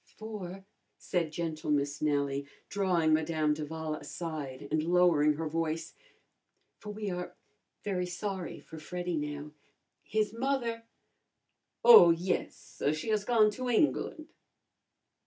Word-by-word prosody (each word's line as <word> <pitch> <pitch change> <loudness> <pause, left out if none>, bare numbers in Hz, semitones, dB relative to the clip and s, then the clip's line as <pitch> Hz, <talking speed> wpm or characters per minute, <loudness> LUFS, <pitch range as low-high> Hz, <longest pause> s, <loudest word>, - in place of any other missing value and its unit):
"For," 195 -4 -7 0.3
said 170 -4 -1
gentle 160 -1 -4
Miss 145 0 0
Nellie, 140 -2 0 0.2
drawing 180 -6 +2
Madame 155 -1 +2
d'Avala 155 +1 -4
aside 145 -3 -6
and 155 0 +2
lowering 165 -3 +4
her 160 +2 -3
voice 165 +1 -2 0.9
"for 210 - -9
we 210 -1 -4
are 180 0 -5 0.5
very 180 -3 -1
sorry 190 0 -4
for 160 - -11
Freddy 180 +2 -4
now. 150 0 -4 0.5
His 215 0 -1
mother 235 -2 -1 0.5
" - - -22
"Oh, 225 -8 +11
yes, 170 +3 -2
she 155 +8 -5
has 215 -2 +1
gone 220 -3 +4
to 250 +4 -4
England." 305 +5 +1
170 Hz, 120 wpm, -31 LUFS, 155-205 Hz, 0.9 s, Oh